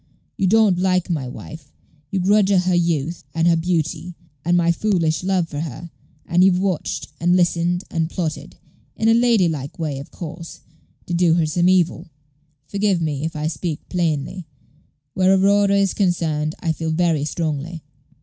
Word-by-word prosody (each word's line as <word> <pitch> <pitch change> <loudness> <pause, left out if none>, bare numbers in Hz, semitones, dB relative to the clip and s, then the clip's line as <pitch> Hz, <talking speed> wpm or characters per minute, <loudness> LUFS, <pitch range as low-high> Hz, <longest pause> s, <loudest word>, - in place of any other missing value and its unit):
You 195 - 0
don't 210 -3 +4
like 185 -1 +1
my 145 -6 -2
wife; 145 +3 -10 0.4
you 195 - -1
grudge 200 +2 +3
her 200 - +4
her 180 0 +2
youth, 170 -2 0
and 165 +1 +2
her 170 - +5
beauty, 170 +1 -2 0.3
and 175 +2 +2
my 170 -1 +3
foolish 170 -4 0
love 185 -3 +1
for 145 -3 -6
her; 160 +2 -6 0.3
and 175 +1 +3
you've 185 -1 +4
watched, 185 -4 -2
and 175 +2 +3
listened, 175 0 +1
and 165 -2 -1
plotted 165 -3 -4 0.4
in 225 - +1
a - - +6
lady 230 -5 +4
like 145 -4 -4
way, 150 -4 -3
of 140 - -9
course 170 0 -9 0.4
to 175 - -5
do 170 -1 +3
her 170 -2 +2
some 175 +3 +2
evil. 180 -3 +1 0.6
Forgive 200 +1 0
me 155 -2 -2
if 165 - -4
I 150 0 -3
speak 160 -1 -4
plainly. 165 -1 -2 0.7
Where 190 +1 +4
Aurora 200 +1 +3
is 195 -1 +2
concerned, 160 -5 0
I 165 - 0
feel 160 0 -3
very 160 -2 +1
strongly. 155 +1 -3
170 Hz, 170 wpm, -21 LUFS, 160-185 Hz, 0.7 s, a